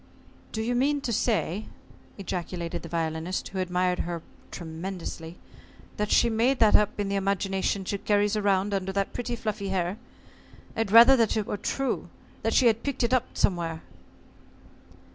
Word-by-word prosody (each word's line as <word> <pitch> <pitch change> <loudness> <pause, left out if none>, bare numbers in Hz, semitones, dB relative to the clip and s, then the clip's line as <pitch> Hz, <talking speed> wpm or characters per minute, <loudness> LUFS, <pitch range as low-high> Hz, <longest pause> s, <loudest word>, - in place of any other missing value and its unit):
"Do 220 - -2
you 240 +2 0
mean 280 +4 +2
to 245 -4 -2
say," 210 -3 0 0.5
ejaculated 180 -3 -4
the 165 - -9
Violinist, 165 +2 -2
who 190 - -5
admired 180 0 0
her 170 -1 -3 0.3
tremendously, 165 0 -6 0.6
"that 210 0 -1
she 235 - +4
made 235 +4 +2
that 220 -3 +5
up 210 0 +3
in 205 - 0
the 200 - -1
imagination 195 0 -1
she 200 +1 -2
carries 205 +1 +2
around 200 -1 +1
under 190 -1 -1
that 195 0 -1
pretty 240 0 -3
fluffy 215 -3 -3
hair? 185 +1 -1 0.8
I'd 225 -2 -1
rather 235 +5 +9
that 225 -2 +2
it 215 - 0
were - - -3
true 270 +6 -2 0.3
that - - 0
she 260 - +5
had 230 -1 +4
picked 280 -3 -2
it 235 - +1
up 255 - 0
somewhere." 165 -4 0
200 Hz, 160 wpm, -27 LUFS, 180-225 Hz, 0.8 s, rather